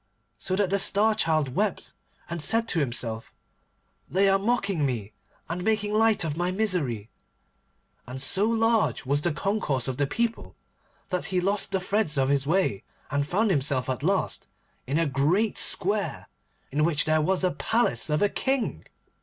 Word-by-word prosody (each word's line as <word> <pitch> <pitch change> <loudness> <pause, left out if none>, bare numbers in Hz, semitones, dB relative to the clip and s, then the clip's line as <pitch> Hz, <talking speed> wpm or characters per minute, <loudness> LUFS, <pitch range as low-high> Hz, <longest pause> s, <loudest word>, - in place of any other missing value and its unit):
so 185 - -1
that 195 -1 0
the 200 - +2
Star 210 +3 +3
Child 155 -10 0
wept, 210 +4 -2 0.3
and 170 -1 -4
said 225 +9 +3
to 170 - 0
himself, 120 -5 -2 0.8
'They 195 +2 +3
are 195 0 +3
mocking 200 -6 0
me, 115 -6 -2 0.3
and 175 +2 -4
making 210 0 0
light 220 -2 +3
of 155 -3 -2
my 175 +2 -1
misery.' 175 - -1 1.0
And 125 +2 -6
so 195 +10 +2
large 225 -6 +1
was 140 +2 +1
the 175 - +1
concourse 150 - -1
of 130 -1 -3
the 145 -1 +1
people, 230 +8 -2 0.5
that 180 -2 -2
he 185 -1 0
lost 195 +3 0
the 190 - +1
threads 185 -5 0
of 135 0 +2
his 140 -1 +1
way, 165 - +1 0.3
and 145 0 0
found 205 +5 +1
himself 135 -5 0
at 130 - -4
last 190 +5 -1 0.4
in 140 +4 0
a 165 - +2
great 155 +10 +1
square, 195 - -1 0.4
in 150 +3 +1
which 155 -2 +3
there 155 0 +2
was 190 +4 0
a 185 - +2
palace 220 - 0
of 150 +5 +1
a - - +5
King. 265 +1 -1
180 Hz, 170 wpm, -26 LUFS, 140-205 Hz, 1.0 s, a